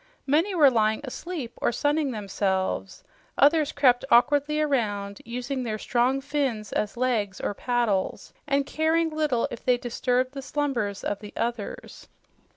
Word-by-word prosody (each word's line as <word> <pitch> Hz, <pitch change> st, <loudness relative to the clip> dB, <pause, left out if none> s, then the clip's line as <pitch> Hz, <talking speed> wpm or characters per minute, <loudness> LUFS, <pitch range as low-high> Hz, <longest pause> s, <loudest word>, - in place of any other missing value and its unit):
Many 325 Hz, +8 st, +2 dB
were 290 Hz, -5 st, +6 dB
lying 220 Hz, -1 st, +2 dB
asleep 280 Hz, -2 st, -6 dB
or -, -, +2 dB
sunning 290 Hz, +3 st, +1 dB
themselves; 195 Hz, -4 st, -2 dB, 0.3 s
others 295 Hz, +1 st, +4 dB
crept 255 Hz, -3 st, +3 dB
awkwardly 290 Hz, +5 st, +4 dB
around, 205 Hz, -9 st, -1 dB
using 250 Hz, +3 st, -4 dB
their 220 Hz, -3 st, -3 dB
strong 250 Hz, +5 st, +1 dB
fins 270 Hz, -7 st, -2 dB
as 210 Hz, +3 st, -2 dB
legs 225 Hz, -6 st, 0 dB
or -, -, -2 dB
"paddles" 235 Hz, -4 st, -1 dB
and 280 Hz, -1 st, +1 dB
caring 320 Hz, +2 st, +1 dB
little 300 Hz, -6 st, 0 dB
if -, -, -7 dB
they 250 Hz, -1 st, +3 dB
disturbed 250 Hz, +1 st, 0 dB
the 275 Hz, -, -5 dB
slumbers 260 Hz, -8 st, -2 dB
of 205 Hz, -, -2 dB
the 210 Hz, -1 st, -10 dB
others. 230 Hz, -3 st, -4 dB
250 Hz, 145 wpm, -26 LUFS, 220-290 Hz, 0.3 s, were